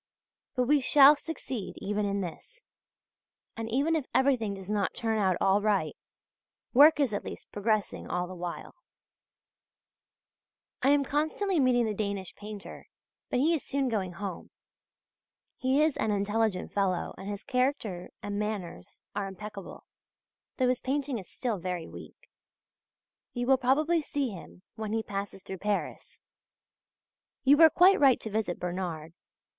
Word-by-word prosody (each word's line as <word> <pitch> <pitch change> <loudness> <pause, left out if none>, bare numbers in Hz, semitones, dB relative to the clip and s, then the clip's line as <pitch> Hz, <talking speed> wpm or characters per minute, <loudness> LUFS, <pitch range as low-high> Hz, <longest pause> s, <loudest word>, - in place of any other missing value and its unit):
But 250 - +2
we 285 +3 +3
shall 280 +2 +7
succeed 270 - -6
even 205 +1 -1
in 200 0 -1
this; 190 - -8 0.9
and 225 0 -5
even 280 +8 +1
if 300 -5 -2
everything 250 -7 +2
does 190 -1 -10
not 205 -2 -1
turn 225 -1 -1
out 190 -3 +2
all 195 +2 +3
right, 200 -7 +1 0.8
work 295 +4 +7
is 270 -7 +2
at 205 - -2
least - - -9
progressing 210 -1 -1
all 180 0 -1
the 180 - -8
while. 175 -1 -6 2.1
I 265 - +3
am 285 0 +4
constantly 315 +6 0
meeting 250 -3 +3
the 215 - -1
Danish 200 -3 -3
painter; 210 -1 -9 0.4
but - - 0
he 305 +7 +3
is 315 - -1
soon 275 -1 -1
going 190 -6 -2
home. 190 -1 -6 1.1
He 270 +2 +3
is 310 -2 +2
an 220 - 0
intelligent 205 -1 0
fellow 190 -3 0
and 195 +1 -8
his 205 0 -5
character 250 -9 -1
and 205 0 -3
manners 200 - -5
are 200 -1 -2
impeccable, 200 +1 -9 0.7
though 255 -2 +2
his 250 0 0
painting 270 -2 -1
is 185 - -12
still 230 -6 -3
very 175 -2 -4
weak. - - -12 1.1
You 245 -1 -2
will 265 +1 +5
probably 305 +6 +2
see 285 -3 -2
him 185 -2 -11
when 215 -1 -5
he 225 0 0
passes 195 -2 -5
through 190 -1 -7
Paris. 205 +1 -3 1.2
You 280 +1 +7
were 320 +1 +8
quite 370 +5 +5
right 270 -3 +5
to 220 - -5
visit 210 -4 -1
Bernard. 175 -3 -4
215 Hz, 150 wpm, -29 LUFS, 195-270 Hz, 2.1 s, were